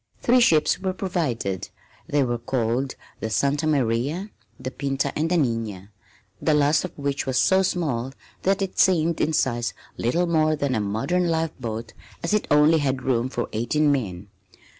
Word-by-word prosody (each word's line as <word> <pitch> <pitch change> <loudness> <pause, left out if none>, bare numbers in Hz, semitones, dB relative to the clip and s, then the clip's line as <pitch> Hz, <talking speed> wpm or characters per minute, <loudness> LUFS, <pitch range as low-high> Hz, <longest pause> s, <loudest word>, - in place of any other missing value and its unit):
Three 250 +1 +5
ships 160 -9 +4
were 190 0 -2
provided. 145 - -2 0.4
They 145 -1 +2
were 120 -2 -1
called 125 +2 -1 0.2
the 110 - -3
Santa 140 +7 +1
Maria, 145 - 0 0.3
the 130 - -5
Pinta 135 -1 -2
and 160 +2 0
the 180 - +2
Nina, 115 - -2 0.5
the 155 - +3
last 150 +1 +3
of 180 - -7
which 140 -1 -2
was 130 -1 0
so 190 +9 +4
small 140 -10 -1 0.3
that 195 +1 +1
it 190 - -5
seemed 170 -3 +3
in 160 - +2
size 120 -6 0 0.2
little 165 +10 +1
more 155 -2 +2
than 140 -3 -1
a 110 - +1
modern 115 - 0
life 160 -1 0
boat 115 -2 -5 0.3
as 170 - 0
it 210 - +1
only 150 +2 +5
had 135 -3 -1
room 125 -1 +1
for 120 -2 -3
eighteen 145 +7 +2
men. 100 -8 -3
140 Hz, 170 wpm, -24 LUFS, 120-165 Hz, 0.5 s, Three